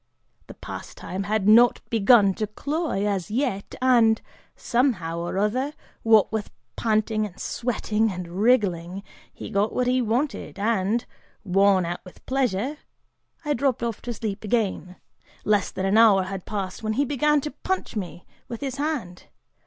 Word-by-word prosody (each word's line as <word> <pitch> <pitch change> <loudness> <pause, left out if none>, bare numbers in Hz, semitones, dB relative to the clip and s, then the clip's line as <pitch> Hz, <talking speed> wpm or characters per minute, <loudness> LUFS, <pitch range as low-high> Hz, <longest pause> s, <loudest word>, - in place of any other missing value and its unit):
The - - -11
pastime 190 +2 -7
had 210 -1 0
not 235 +3 +6
begun 210 -2 +5
to 215 +2 -3
cloy, 285 - -2
as 200 -2 -1
yet, 220 -4 -2
and, 230 -4 +5 0.4
somehow 210 -10 0
or 175 +2 -3
other, 250 +8 0 0.3
what 220 -2 +4
with 220 -2 -3 0.3
panting 215 -1 +1
and 185 - -16
sweating 225 -2 -1
and 180 -1 -6
wriggling, 190 -2 +1 0.3
he - - -9
got 200 +2 +1
what 250 - 0
he 255 +1 +2
wanted 245 +6 -2
and, 215 +1 0 0.4
worn 195 -1 +3
out 175 +1 -5
with 185 - -16
pleasure, 260 +1 -1 0.7
I 295 - +1
dropped 260 -2 0
off 230 -2 -3
to 245 - -5
sleep 215 -1 -4
again. 205 -4 -1 0.5
Less 210 -2 +2
than 190 - -4
an 200 +3 +4
hour 205 -4 +6
had 190 0 -6
passed 195 -1 -4
when 220 0 -1
he 280 +6 +1
began 295 +2 +2
to 300 - -4
punch 375 +5 -3
me 180 -3 -5 0.2
with 235 - -7
his 270 -1 -4
hand. 280 - -3
215 Hz, 155 wpm, -24 LUFS, 195-245 Hz, 0.7 s, not